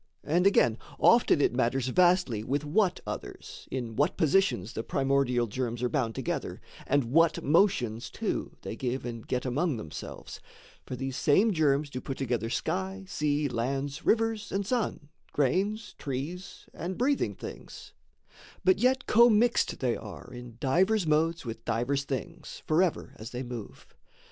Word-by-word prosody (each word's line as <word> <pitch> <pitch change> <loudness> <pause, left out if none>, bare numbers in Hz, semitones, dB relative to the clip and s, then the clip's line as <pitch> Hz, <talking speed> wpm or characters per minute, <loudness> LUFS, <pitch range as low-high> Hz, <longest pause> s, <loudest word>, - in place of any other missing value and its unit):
And, 175 +5 +3
again, 120 - +3 0.2
Often 235 -10 +5
it - - +3
matters 130 +1 +1
vastly 175 - +3
with 140 +5 -1
what 180 +5 +1
others, - - -7
In 120 -4 -4
what 145 - +1
positions 160 - +2
the 110 - -3
primordial 135 -1 +1
germs 120 +1 -3
Are 125 - +1
bound 120 -7 -1
together, - - -3 0.3
and 140 0 +3
what 165 +2 +3
motions, 135 - +2
too, - - -3
They - - -5
give 130 +2 -3
and 115 -2 -6
get 125 +1 -1
among 140 +3 0
themselves; 80 -8 -8 0.5
for 130 - -4
these 135 +1 -4
Same 200 +9 +4
germs 150 -3 +2
do 130 - -5
put 135 - -5
together 120 -4 -1
sky, 190 +8 -2
sea, 150 -3 0
lands, 135 +4 -2
Rivers, 225 -1 +1
and 195 0 -1
sun, 215 - -2 0.2
grains, 190 - 0
trees, 145 +8 -5
and 175 +3 -5
breathing 275 +4 +1
things, - - -10 0.7
But 375 - +4
yet 260 +2 +2
commixed 235 +1 +4
they 125 -3 +1
are 110 +3 -9
in 120 -2 -10
divers 185 - +2
modes 160 +1 +1
With 115 -1 -6
divers 120 +5 -1
things, 135 -2 -6
forever 165 +2 +1
as 110 +2 -8
they 125 0 -5
move. 120 -4 -8
140 Hz, 150 wpm, -29 LUFS, 125-185 Hz, 0.7 s, Often